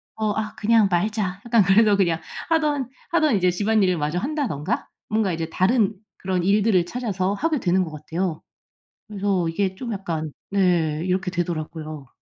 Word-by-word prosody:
어 215 -1 0
'아 215 +1 -3
그냥 220 -1 +4
말자.' 195 +1 0
약간 230 -3 +4
그래서 200 +2 +5
그냥 170 -4 +1 0.3
하던 300 -5 +1 0.2
하던 310 -7 +3
이제 180 -1 +3
집안일을 200 -1 +2
마저 150 +3 -1
한다든가 250 - -2 0.2
뭔가 215 -4 +1
이제 165 0 -3
다른 210 +3 +2 0.2
그런 185 -2 -1
일들을 200 -2 +3
찾아서 195 -3 -2
하게 305 +7 0
되는 185 -2 +2
것 165 - -6
같아요. 160 +3 -3 0.7
그래서 195 -4 0
이게 190 +2 -1
좀 235 +4 -5
약간 165 -6 -4 0.2
네. 170 -5 +2
이렇게 185 +1 0
되더라고요. 155 -4 -4
190 Hz, 335 characters per minute, -23 LUFS, 175-215 Hz, 0.7 s, 그래서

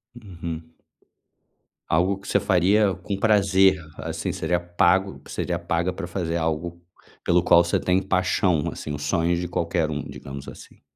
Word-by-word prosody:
Uhum. 85 -7 -8 1.2
Algo 90 +4 +2
que 100 - -13
você - - +2
faria 95 +2 +3
com 95 +2 -5
prazer, 95 -3 +4 0.2
assim 80 +2 -3
seria 90 -1 -1
pago 90 +2 +1
que - - -14
seria 85 -2 -2
paga 85 +1 -1
pra 85 - -6
fazer 85 -2 -2
algo 85 +1 -2 0.4
pelo 90 0 +3
qual 85 0 +6
você 85 - 0
tem 90 +1 +1
paixão, 90 -3 +1
assim, 75 - -6
os 75 - -5
sonhos 85 +2 +1
de 90 - -3
qualquer 85 -2 -1
um, 75 -1 -3
digamos 70 0 -9
assim. - - -12
85 Hz, 160 wpm, -24 LUFS, 85-95 Hz, 1.2 s, qual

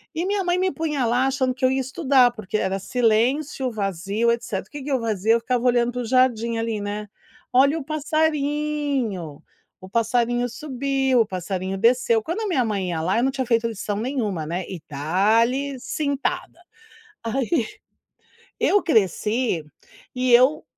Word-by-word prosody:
E 335 +3 -1
minha 400 0 0
mãe 355 0 +1
me 375 0 +1
punha 300 -6 -1
lá 245 +3 +2
achando 260 -1 0
que 255 +1 0
eu 255 - +4
ia 265 0 +1
estudar, 265 -2 +3
porque 215 -3 -4
era 190 -2 -1
silêncio, 250 +5 +1
vazio, 200 +2 -1
etcétera. 230 -5 -3
Que 290 -2 -7
que 285 - -5
eu 265 - +2
fazia? 220 -1 +1
Eu 230 - +3
ficava 245 +1 -1
olhando 240 -1 +3
para 250 - -3
o - - -4
jardim, 235 -2 +2
ali, 225 -1 -2
né. 205 +1 -4 0.4
Olha 275 +5 +4
o - - -6
passarinho, 295 - -1 0.4
o 185 - -11
passarinho 240 +2 +1
subiu, 270 -1 0
o - - +2
passarinho 185 +1 -3
desceu. 230 +1 +3
Quando 335 - -3
a 435 - -2
minha 325 -10 +1
mãe 200 -4 -2
ia 165 -2 -2
lá, 185 +6 0
eu 235 - +2
não 265 - +2
tinha 265 -1 -2
feito 230 -1 +2
lição 210 -2 -4
nenhuma, 215 - -2
né, 175 +4 -3
e 185 - -6
dale 225 - +1
cintada. 290 +6 -3 0.7
Aí, 245 +2 0 0.9
eu 410 - +3
cresci 220 - +1 0.5
e 255 -1 +1
eu 255 +5 +5
245 Hz, 165 wpm, -23 LUFS, 215-275 Hz, 0.9 s, eu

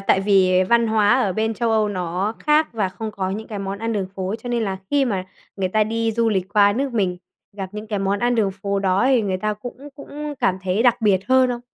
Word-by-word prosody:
tại 195 -1 +2
vì 190 -2 +4
văn 235 -1 +4
hóa 215 +1 +3
ở 200 -6 +1
bên 220 +3 -1
Châu 235 +1 -1
Âu 215 -1 +2
nó 185 +2 -2
khác 305 +1 +2
và 210 -4 -1
không 220 +3 -6
có 190 -2 -3
những 215 +3 -5
cái 210 - -5
món 195 0 -4
ăn 225 +1 -2
đường 200 -3 -1
phố, 190 +2 -3
cho 245 - -6
nên 240 -1 0
là 195 -2 -2
khi 285 -1 +3
mà 195 -7 -2 0.3
người 190 -2 -1
ta 215 +3 +2
đi 225 +1 -1
du 230 0 +1
lịch 190 -4 0
qua 205 -1 +5
nước 270 +3 -2
mình, 190 -6 0 0.4
gặp 195 -2 -4
những 210 +1 -7
cái 210 -2 -2
món 195 +1 0
ăn 240 +2 +1
đường 210 -4 +1
phố 200 0 0
đó 190 -1 +1
thì 260 -4 +3
người 190 -2 -1
ta 210 +3 -2
cũng 240 +4 -9 0.2
cũng 295 +1 -7
cảm 185 0 +1
thấy 190 +4 0
đặc 245 -1 +3
biệt 200 -4 +3
hơn 260 0 +5
không? 240 -1 -3
210 Hz, 260 wpm, -21 LUFS, 195-230 Hz, 0.4 s, qua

